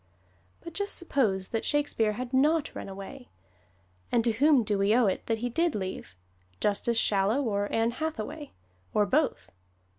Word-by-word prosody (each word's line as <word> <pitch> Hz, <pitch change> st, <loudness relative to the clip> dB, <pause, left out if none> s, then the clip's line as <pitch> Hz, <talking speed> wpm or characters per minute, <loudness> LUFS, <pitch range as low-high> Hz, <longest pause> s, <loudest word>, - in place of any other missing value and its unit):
But 335 Hz, -, -9 dB
just 405 Hz, +3 st, -2 dB
suppose 220 Hz, -, 0 dB
that 225 Hz, -, -2 dB
Shakespeare 285 Hz, -7 st, +1 dB
had 250 Hz, +3 st, -6 dB
not 295 Hz, +4 st, +2 dB
run -, -, -7 dB
away! 195 Hz, +7 st, -9 dB, 0.8 s
And 235 Hz, -, +3 dB
to 235 Hz, -, +3 dB
whom 275 Hz, +2 st, +4 dB
do 205 Hz, -1 st, 0 dB
we 200 Hz, +3 st, +3 dB
owe 245 Hz, -1 st, +4 dB
it 190 Hz, -, -1 dB
that 225 Hz, -, +1 dB
he 245 Hz, +2 st, -2 dB
did 335 Hz, +4 st, +1 dB
leave 185 Hz, -, -5 dB, 0.4 s
Justice 210 Hz, +3 st, 0 dB
Shallow 210 Hz, +6 st, +2 dB
or 205 Hz, -4 st, -1 dB
Ann 225 Hz, +1 st, +1 dB
Hathaway, 300 Hz, +1 st, -5 dB, 0.5 s
or 210 Hz, -, +4 dB
both? 260 Hz, -, 0 dB
230 Hz, 160 wpm, -28 LUFS, 205-285 Hz, 0.8 s, whom